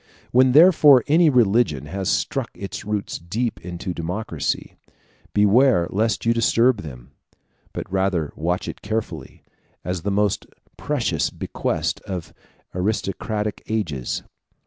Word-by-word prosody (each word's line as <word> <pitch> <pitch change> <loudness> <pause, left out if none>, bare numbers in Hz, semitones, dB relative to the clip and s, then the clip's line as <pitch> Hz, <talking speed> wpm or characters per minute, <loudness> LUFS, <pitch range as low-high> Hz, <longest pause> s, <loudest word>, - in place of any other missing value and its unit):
When 130 +1 +4
therefore 150 -5 +7
any 160 +2 +4
religion 110 - +2
has 95 +5 -3
struck - - -1
its 100 - -6
roots 105 -1 -3
deep 110 +8 -3
into 90 +1 -5
a - - -4
democracy, 85 -1 -3 0.6
beware 105 -1 +4
lest 110 +4 0
you 115 - +4
disturb 115 0 +3
them; 65 -5 -10 0.6
but - - -5
rather 95 -5 0
watch 90 +3 -2
it - - -7
carefully, 110 +1 -5 0.4
as 90 0 -3
the 100 - -2
most 100 0 0 0.3
precious - - -1
bequest - - -3
of 90 -3 -6 0.4
aristocratic 105 +2 -2
ages. 80 - -2
105 Hz, 125 wpm, -22 LUFS, 90-115 Hz, 0.6 s, therefore